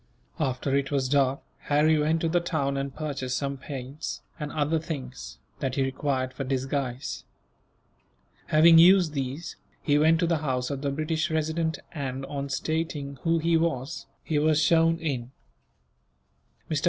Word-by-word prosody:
After 135 -1 0
it 140 -1 0
was 135 -3 0
dark, 135 0 +2 0.2
Harry 150 +2 +3
went 160 +2 +1
to 165 - +1
the 175 +2 +2
town 155 -5 -1
and 140 0 -2
purchased 140 -4 -3
some 140 -1 -2
paints, 135 +2 -6 0.2
and 150 -1 -4
other 155 +1 +1
things, 130 - -7 0.2
that 130 -2 -2
he 135 - +2
required 130 -1 -1
for 135 - -4
disguise. 135 -1 -2 1.2
Having 165 +2 +7
used 175 -2 +6
these, 140 +3 -4 0.3
he 145 -1 +3
went 160 +2 +4
to - - +3
the 165 -1 +2
house 130 -3 -1
of 140 -1 -4
the 140 - 0
British 155 +3 -1
Resident 160 0 0
and, 135 -3 -4
on 140 0 -4
stating 145 -1 -2
who 165 0 +2
he 165 +1 +2
was, 160 -3 -1 0.2
he 150 -2 0
was 155 0 +3
shown 165 +1 +4
in. 135 -7 -3 1.4
Mr. - - 0
145 Hz, 155 wpm, -27 LUFS, 135-160 Hz, 1.4 s, Having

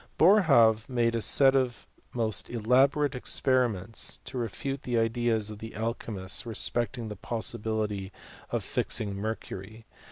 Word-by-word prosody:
Boerhaave 135 - +5
made 120 -2 +1
a 115 - -1
set 135 +4 +5
of 130 -3 0 0.3
most 110 -3 0
elaborate 130 +5 +2
experi 130 -1 +1
ments, 100 +3 -3
to - - -9
refute 135 +4 -4
the 120 -2 -2
ideas 115 -1 0
of 105 - -9
the 110 +1 -9
alchy 115 +1 -3
mists 95 -2 0
respecting 120 +1 -2
the 105 - -6
possibility 110 -2 -2 0.4
of - - -2
fixings 105 -2 -1
mercury. 110 +1 -6
115 Hz, 135 wpm, -28 LUFS, 110-125 Hz, 0.4 s, Boerhaave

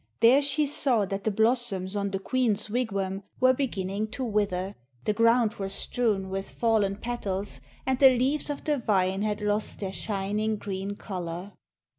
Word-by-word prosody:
There 250 +5 +6
she 290 +1 +2
saw 260 -6 +3
that 195 +1 -5
the - - +3
blossoms 220 -3 +1
on 200 -1 -1
the 195 - -2
queen's 215 -1 0
wigwam 195 -5 -1 0.2
were 255 0 +5
beginning 210 -6 -2
to 260 - -3
wither, 200 -4 -1 0.3
the 210 - +2
ground 230 0 +3
was 195 -1 -3
strewn 200 -5 0
with 195 0 -3
fallen 220 -4 +1
petals, 200 - -4 0.2
and 260 -1 0
the 265 -2 +7
leaves 275 +5 +1
of 290 - -4
the 295 -2 0
vine 195 -4 +1
had 210 0 -1
lost 210 +1 -1
their 190 -2 -4
shining 210 +2 -1
green 200 -1 -4
colour. 180 -1 -6
210 Hz, 165 wpm, -27 LUFS, 195-240 Hz, 0.3 s, the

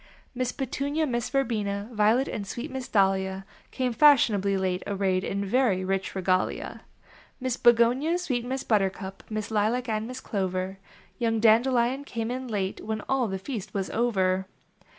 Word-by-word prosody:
Miss 255 -1 -1
Petunia, 285 +4 -2
Miss 240 -4 -2
Verbena, 210 -7 -1
Violet, 220 +5 +3
And 200 -2 -4
sweet 245 +9 -5
Miss 260 -1 -5
Dahlia 190 -1 +1 0.2
Came 255 -2 -1
fashionably 220 -9 +4
late, 185 -1 -1
arrayed 190 -2 0
In 200 0 -2
very 200 -4 +2
rich 195 +1 -2
regalia. 185 -1 -1 0.6
Miss 255 -2 -1
Begonia, 245 +8 +4
sweet 260 -10 -2
Miss 260 +2 -3
Buttercup, 195 -2 -1
Miss 215 0 -4
Lilac 220 +4 +1
and 220 0 -1
Miss 255 +1 -6
Clover; 190 -3 -3 0.4
Young 225 -2 +1
Dandelion 240 +4 +3
came 230 -4 -4
in 255 +1 -4
late 200 -4 -2
When 215 0 -3
all 265 -3 +1
the 190 -1 -3
feast 210 0 -6
was 195 -1 -2
over. 190 -5 +1
220 Hz, 150 wpm, -27 LUFS, 195-255 Hz, 0.6 s, fashionably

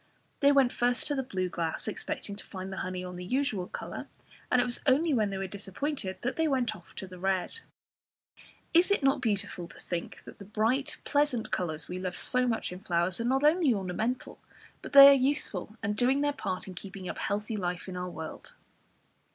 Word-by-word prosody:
They 280 0 +6
went 270 -3 +4
first 245 -1 +1
to 290 - -1
the 270 - 0
blue 190 -8 -2
glass, 170 0 -3
expecting 205 -1 -4
to - - -6
find 190 -1 -7
the - - -6
honey 185 0 -3
on 180 0 -7
the 180 - -6
usual 215 -3 -1
colour, - - -6 0.4
and 250 - +5
it - - +3
was 240 -1 -1
only 295 +4 +4
when 215 -5 +2
they 195 - -3
were 195 - -2
disappointed 200 +3 -4
that 250 - -2
they 320 0 +2
went 250 -6 +1
off 180 -1 -16
to - - -5
the 185 -1 -11
red. 190 - +1 1.1
Is 345 +3 +5
it 400 -7 +2
not 270 0 +3
beautiful 200 -6 -2
to - - -13
think 175 -1 -5
that - - -12
the 200 - -9
bright 225 +7 0
pleasant 285 -5 +1
colours 160 -4 -2
we 180 +1 -5
love 185 -1 -4
so 250 0 +1
much 225 -5 -1
in 180 - -7
flowers, 175 0 0
are - - -2
not 265 +3 +2
only 300 -4 +4
ornamental, 205 +6 -3 0.4
but - - -9
that 280 - +10
they 275 - +13
are - - +9
useful 255 -7 0
and 205 0 0
doing 255 +5 +3
their 290 0 +1
part 185 -9 -4
in 190 - -7
keeping 190 +1 -8
up - - -5
healthy 210 +2 -2
life 180 -2 -3
in 185 - -6
our 180 0 -3
world? 160 -2 -8
210 Hz, 215 wpm, -29 LUFS, 185-265 Hz, 1.1 s, they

